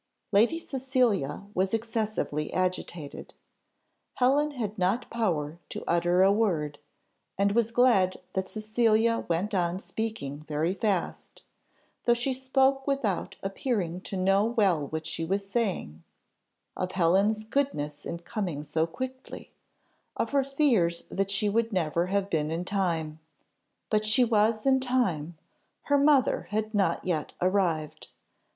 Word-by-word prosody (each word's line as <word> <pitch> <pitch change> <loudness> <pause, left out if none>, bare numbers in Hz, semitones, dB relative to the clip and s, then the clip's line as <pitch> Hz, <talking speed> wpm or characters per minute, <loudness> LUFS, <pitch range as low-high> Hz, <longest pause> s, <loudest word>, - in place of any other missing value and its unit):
Lady 225 +10 +4
Cecilia 255 - 0
was 190 +3 +1
excessively 215 -9 -2
agitated. 180 -4 -3 0.8
Helen 275 +4 +3
had 220 -7 -4
not 190 +7 0
power 170 -9 -1
to - - -6
utter 175 +2 +3
a 195 - +6
word, 165 -9 0 0.6
and 200 +1 +2
was 230 +1 +2
glad 230 -6 +3 0.2
that 190 -1 -2
Cecilia 225 +1 +1
went 180 +6 0
on 175 -2 +1
speaking 195 -9 -4
very 155 +4 0
fast; 195 -3 -2 0.6
though 240 - +5
she 245 +3 -1
spoke 265 +1 +1
without 250 -10 -1
appearing 195 - -2
to 195 - -5
know 195 +2 +3
well 200 - +2
what 160 +1 -4
she 165 0 -3
was 195 +4 -1
saying: 190 - -2 0.7
of 185 0 -3
Helen's 195 +5 +2
goodness 185 - -2
in 170 - -4
coming 170 -4 -4
so 160 +2 0
quickly, 260 +8 -7 0.7
of - - -1
her 280 -1 +3
fears 255 - +1
that 195 0 -1
she 200 +1 +1
would 230 +2 +1
never 170 -2 0
have 195 +1 0
been 155 -5 0
in 165 +2 -3
time 165 -6 -1 0.7
"but 215 -1 +2
she 215 +4 +4
was 220 -1 +2
in 265 -1 +4
time, 190 - -1 0.5
her 285 - +2
mother 280 -3 +3
had 215 +1 -2
not 195 -5 +1
yet 165 -5 -2
arrived. 175 -5 0
200 Hz, 135 wpm, -28 LUFS, 170-230 Hz, 0.8 s, a